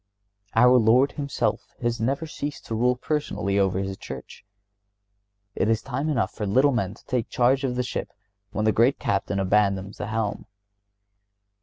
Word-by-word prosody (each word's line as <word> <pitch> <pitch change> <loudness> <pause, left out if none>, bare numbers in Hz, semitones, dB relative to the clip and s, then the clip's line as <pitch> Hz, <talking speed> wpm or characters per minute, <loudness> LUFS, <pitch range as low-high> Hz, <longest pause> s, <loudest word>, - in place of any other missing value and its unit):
Our 125 +2 +6
Lord 120 +5 +4
Himself 140 -2 -2
has 120 -1 -1
never 135 +7 0
ceased 145 -2 -6
to - - -5
rule 125 +3 +2
personally 125 -8 -1
over 95 -2 +2
His 95 0 -3
Church. 65 -1 -9 1.1
It 105 - 0
is 115 0 +1
time 135 +4 -2
enough 130 -7 0
for 105 - -4
little 130 +8 +4
men 110 -5 -1
to - - -21
take 125 -3 -1
charge 130 +3 +2
of 125 -2 -1
the 125 - 0
Ship 125 - -4 0.4
when 105 +1 -2
the 110 - +4
great 120 +6 +3
Captain 100 0 -1
abandons 100 0 +1
the - - -4
helm. 110 -2 -2
115 Hz, 165 wpm, -25 LUFS, 100-130 Hz, 1.1 s, Our